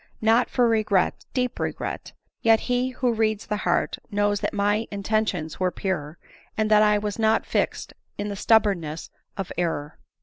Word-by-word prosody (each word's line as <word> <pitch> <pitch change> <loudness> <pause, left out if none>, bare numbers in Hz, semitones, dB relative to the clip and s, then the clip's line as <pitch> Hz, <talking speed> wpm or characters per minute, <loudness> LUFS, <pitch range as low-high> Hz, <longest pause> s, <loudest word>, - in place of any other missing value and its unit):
not 225 +3 +3
for 245 -2 +3
regret, 215 -4 +1
deep 250 -1 -1
regret; - - -4 0.3
yet 225 -1 +4
he 250 0 0
who 250 -1 0
reads 220 -1 0
the 210 - -2
heart - - 0
knows 205 -1 +1
that - - -2
my 205 +2 0
intentions 200 -5 -1
were 185 -1 +2
pure, 170 -5 -3 0.4
and 215 0 +1
that 210 0 +7
I 210 -1 +4
was 205 +1 -3
not 220 0 +2
fixed - - -1 0.2
in 205 - -3
the 205 - -4
stubbornness 195 -8 +1 0.3
of 195 -2 -4
error." 150 -4 -2
210 Hz, 165 wpm, -24 LUFS, 195-225 Hz, 0.4 s, that